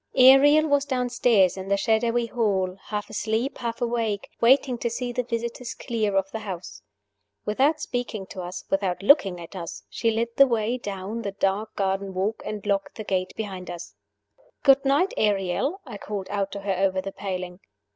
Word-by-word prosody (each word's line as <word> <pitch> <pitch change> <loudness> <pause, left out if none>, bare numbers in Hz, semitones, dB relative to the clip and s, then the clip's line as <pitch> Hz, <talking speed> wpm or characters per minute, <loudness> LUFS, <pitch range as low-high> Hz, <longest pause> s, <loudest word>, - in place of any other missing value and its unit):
ARIEL 280 +4 +7
was 285 -1 +2
downstairs 245 -7 +2
in 190 0 -6
the 200 0 +2
shadowy 230 +3 +1
hall, 195 -6 0
half 210 -1 -4
asleep, 220 +5 -1
half 235 -1 -4
awake, 230 -4 -1
waiting 255 +1 +4
to 235 - -1
see 245 +1 -3
the 250 +1 0
visitors 235 0 -4
clear 220 -5 -1
of 195 0 0
the 220 - -4
house. 190 -4 -7 0.6
Without 275 +9 +2
speaking 245 -7 -3
to 185 0 -8
us, 180 +1 -6
without 195 -1 0
looking 195 - +5
at 170 +3 -10
us, 170 - -6
she 230 - 0
led 225 +1 0
the 275 - +8
way 230 -1 0
down 205 +1 -5
the 200 -3 -4
dark 200 +2 -1
garden 195 -1 -1
walk, 200 +4 -1
and 210 -2 -5
locked 200 -1 -1
the 215 - -6
gate 185 -2 -1
behind 190 -4 -5
us. 170 -12 -7 0.7
"Good 275 0 +6
night, 285 +8 +2
Ariel," 205 - +1
I 225 -7 -8
called 200 -2 -5
out 200 -1 -1
to 200 - -5
her 195 0 -1
over 190 -1 +2
the 195 +1 -4
paling. 185 -2 -5
210 Hz, 180 wpm, -25 LUFS, 195-240 Hz, 0.7 s, the